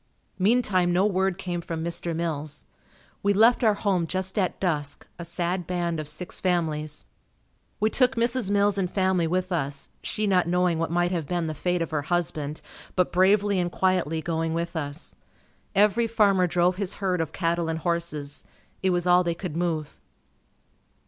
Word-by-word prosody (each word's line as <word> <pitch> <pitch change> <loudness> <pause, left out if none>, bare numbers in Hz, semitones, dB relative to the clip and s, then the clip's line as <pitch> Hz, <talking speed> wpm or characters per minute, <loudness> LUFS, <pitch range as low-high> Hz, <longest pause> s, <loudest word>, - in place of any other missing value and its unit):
Meantime 190 -4 +3
no 180 +3 +3
word 190 -2 +1
came 180 -3 -3
from 165 -1 -4
Mr. 170 0 -2
Mills. 155 -3 -3 0.6
We 200 0 +2
left 230 +5 +5
our 215 -2 +4
home 190 -5 0
just 185 +4 -2
at 185 - -1
dusk, 150 -6 -2
a - - -4
sad 175 +1 -2
band 175 -2 -1
of 155 - -4
six 155 +4 -4
families. 155 -4 -1 0.7
We 215 +1 +2
took 255 -3 +3
Mrs. 235 -2 +1
Mills 200 0 +2
and 180 -2 0
family 185 -3 +1
with 185 +2 -1
us, 140 -4 -2
she 215 - -1
not 185 -4 +3
knowing 180 -1 +2
what 165 - -1
might 175 +1 +1
have 165 -5 -2
been 175 0 -1
the 155 - -2
fate 180 +2 0
of 165 - -7
her 155 -2 0
husband, 155 -2 -2 0.3
but 180 -1 +2
bravely 195 +2 +3
and 175 -1 -1
quietly 170 -5 0
going 165 0 -1
with 170 +1 -3
us. 145 0 -4 0.6
Every 210 +4 +4
farmer 200 -5 +3
drove 175 +1 +2
his 200 -1 -2
herd 185 -3 0
of 160 - -3
cattle 170 -1 -1
and 160 - -1
horses. 160 -4 -3 0.4
It 190 - +2
was 175 -1 0
all 180 0 +5
they 170 -1 -1
could 170 -3 -6
move. 165 -3 -2
175 Hz, 175 wpm, -26 LUFS, 165-190 Hz, 0.7 s, left